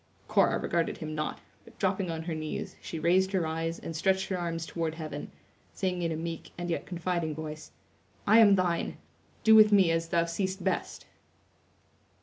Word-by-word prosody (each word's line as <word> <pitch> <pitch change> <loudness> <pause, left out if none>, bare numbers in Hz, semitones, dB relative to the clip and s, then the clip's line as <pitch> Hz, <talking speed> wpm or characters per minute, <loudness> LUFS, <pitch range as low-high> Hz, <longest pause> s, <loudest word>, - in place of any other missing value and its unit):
Cora - - +3
regarded 170 -1 -1
him 155 -1 -5
not, 155 0 -3 0.2
but 230 - -18
dropping 190 -1 0
on 160 -1 -3
her 165 0 -3
knees, 155 -1 -4
she 165 - -6
raised 185 +4 +2
her 185 -4 +1
eyes 165 +1 -2
and 165 - -7
stretched 190 +4 +1
her 190 - 0
arms 165 -1 -3
toward 165 -2 -3
heaven, 155 -3 -6 0.4
saying 180 -2 -1
in 165 -1 0
a - - -1
meek 165 +1 -5
and 175 0 -3
yet - - -3
confiding 170 -3 -2
voice: 155 0 -7 0.6
"I 220 +3 +6
am 205 -3 +7
thine; 175 -3 0 0.5
do 220 - +7
with 215 -1 +8
me 190 -5 +5
as 165 0 0
thou 170 -1 +2
seest 190 +3 -3
best!" - - -2
170 Hz, 180 wpm, -29 LUFS, 160-190 Hz, 0.6 s, with